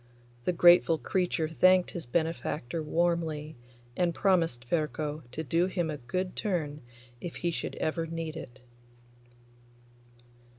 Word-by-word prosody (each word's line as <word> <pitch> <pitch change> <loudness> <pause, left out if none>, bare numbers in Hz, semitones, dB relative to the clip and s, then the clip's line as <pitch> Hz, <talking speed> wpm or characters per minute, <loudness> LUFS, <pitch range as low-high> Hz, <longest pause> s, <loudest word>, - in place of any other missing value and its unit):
The - - +3
grateful 175 -1 +6
creature 175 -2 0
thanked 185 +3 +4
his 170 -7 -6
benefactor 160 -1 -1
warmly, 160 -1 0 0.4
and 175 0 +1
promised 165 -11 +2
Ferko 155 0 -1
to 155 +5 -4
do 165 +5 +2
him 175 -4 -1
a 150 - -4
good 180 +9 -3
turn 155 -7 -2 0.4
if 175 - -6
he 175 - -1
should - - -4
ever 165 +1 -1
need 165 -1 -4
it. 130 -5 -9
165 Hz, 125 wpm, -29 LUFS, 155-175 Hz, 0.4 s, grateful